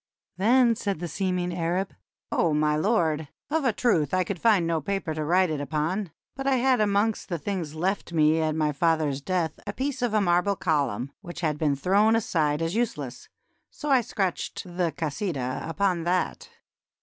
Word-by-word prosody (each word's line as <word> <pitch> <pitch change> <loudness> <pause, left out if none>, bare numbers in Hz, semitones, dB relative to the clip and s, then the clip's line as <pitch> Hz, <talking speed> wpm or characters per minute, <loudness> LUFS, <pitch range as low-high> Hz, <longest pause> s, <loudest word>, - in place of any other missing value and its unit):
Then 235 +4 +4
said 200 -4 -2
the 175 +2 -4
seeming 180 0 -1
Arab: 180 +3 -1 0.4
"0 160 -3 +2
my 150 0 +2
Lord! 160 -4 +1 0.2
of 320 -1 +1
a 250 - +4
truth 185 - +1
I 185 - +3
could 180 -1 -5
ffiid 215 -6 +4
no 165 -1 0
paper 195 -1 -2
to 155 0 -3
write 180 +2 +3
it 150 -2 -2
upon; 160 +7 -1 0.3
but 270 +1 -4
I 270 - +4
had 255 -2 +3
amongst 210 +1 +1
the 175 - -1
things 165 -2 -4
left 185 +3 -1
me 155 -1 +3
at 155 -1 0
my 155 -1 +1
father's 150 -2 +1
death 170 -1 -1
a 205 - -3
piece 265 +1 -3
of 240 -3 0
a - - +5
marble 180 +1 +2
column 140 - -1
which 175 -3 -8
had 155 -3 -1
been 150 -3 +2
thrown 200 +9 +3
aside 160 -8 +1
as 165 +1 -1
useless, 150 - -3 0.4
so 295 -1 -4
I 260 -2 +6
scratched 195 -5 -2
the 175 -2 -2
'Kasidah' 150 -3 -3
upon 185 0 +1
that." 180 +1 -1
175 Hz, 185 wpm, -26 LUFS, 155-205 Hz, 0.4 s, I